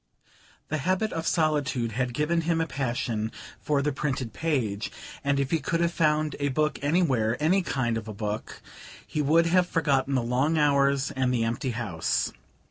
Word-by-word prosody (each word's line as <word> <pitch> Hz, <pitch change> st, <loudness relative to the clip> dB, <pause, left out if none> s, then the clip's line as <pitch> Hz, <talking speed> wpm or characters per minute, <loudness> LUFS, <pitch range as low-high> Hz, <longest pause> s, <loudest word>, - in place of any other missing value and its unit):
The 155 Hz, -, -1 dB
habit 185 Hz, +8 st, 0 dB
of 165 Hz, 0 st, -3 dB
solitude 145 Hz, -7 st, +1 dB
had 120 Hz, +2 st, -2 dB
given 165 Hz, +4 st, +1 dB
him 165 Hz, 0 st, 0 dB
a 165 Hz, -, +1 dB
passion 120 Hz, -6 st, -2 dB, 0.3 s
for 145 Hz, -2 st, 0 dB
the 150 Hz, -, +1 dB
printed 135 Hz, -4 st, -3 dB
page, 120 Hz, -11 st, -1 dB, 0.3 s
and 140 Hz, 0 st, +1 dB
if 135 Hz, -1 st, -1 dB
he 165 Hz, -, +2 dB
could 165 Hz, +4 st, -1 dB
have 170 Hz, 0 st, +1 dB
found 155 Hz, -2 st, +1 dB
a 145 Hz, -, +1 dB
book 150 Hz, +3 st, 0 dB
anywhere 135 Hz, -7 st, +2 dB
any 175 Hz, +6 st, +3 dB
kind 120 Hz, -9 st, -1 dB
of 110 Hz, -, -11 dB
a -, -, -5 dB
book 105 Hz, +1 st, -5 dB, 0.4 s
he 150 Hz, -, -2 dB
would 160 Hz, +4 st, +4 dB
have 180 Hz, +1 st, +3 dB
forgotten 140 Hz, -4 st, +1 dB
the 125 Hz, -, +1 dB
long 130 Hz, +7 st, +1 dB
hours 140 Hz, -2 st, +3 dB
and 130 Hz, -2 st, 0 dB
the 120 Hz, -2 st, +1 dB
empty 120 Hz, +4 st, -1 dB
house. 105 Hz, -9 st, -1 dB
140 Hz, 180 wpm, -27 LUFS, 120-155 Hz, 0.4 s, would